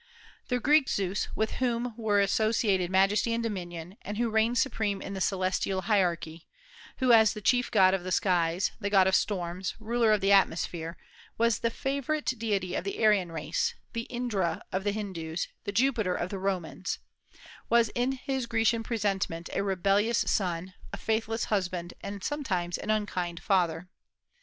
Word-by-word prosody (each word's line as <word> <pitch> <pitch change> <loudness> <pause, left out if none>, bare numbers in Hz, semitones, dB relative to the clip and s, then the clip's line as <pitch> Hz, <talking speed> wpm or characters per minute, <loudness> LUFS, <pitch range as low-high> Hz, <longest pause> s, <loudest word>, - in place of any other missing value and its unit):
The 250 -1 0
Greek 290 +2 +4
Zeus, 195 0 -1
with 220 0 0
whom 240 -1 0
were 215 -3 +1
associated 200 -2 +2
majesty 195 +5 +3
and 230 0 -1
dominion, 180 -3 -5
and 205 +1 -6
who 235 -1 0
reigned 220 +2 +2
supreme 220 -5 0
in 200 - -6
the 190 - -4
celestial 190 0 0
hierarchy, 170 -6 0 0.5
who 255 -2 +3
as 220 -2 +6
the 215 - -6
chief 245 +4 +2
god 185 0 +5
of 190 -2 -1
the 185 - -4
skies, 180 -3 +1
the 200 -2 -2
god 195 -2 +5
of 190 - +2
storms, 185 -2 -1
ruler 230 0 +2
of 215 - +4
the 195 +1 +2
atmosphere, 170 -3 +1 0.4
was 230 -2 +2
the 230 - +1
favorite 280 +5 -2
deity 200 -5 -1
of - - -1
the 200 - -4
Aryan 195 -5 +3
race, 155 0 -1 0.2
the 230 0 -4
Indra 235 -8 -1
of 190 +1 -1
the 205 - +2
Hindus, 180 -6 -4 0.2
the - - -2
Jupiter 220 -4 +1
of 175 - -3
the 195 - -4
Romans, 185 -1 -2 0.7
was 235 -1 +4
in 245 +4 0
his 265 -1 -3
Grecian 225 0 +2
presentment 195 -7 -2
a - - 0
rebellious 200 +3 +1
son, 180 -1 -1 0.2
a - - -5
faithless 225 0 -1
husband, 180 -3 -2
and 200 -1 -6
sometimes 185 - -2
an - - -6
unkind 185 -5 -1
father. 180 -3 +1
200 Hz, 165 wpm, -29 LUFS, 185-230 Hz, 0.7 s, as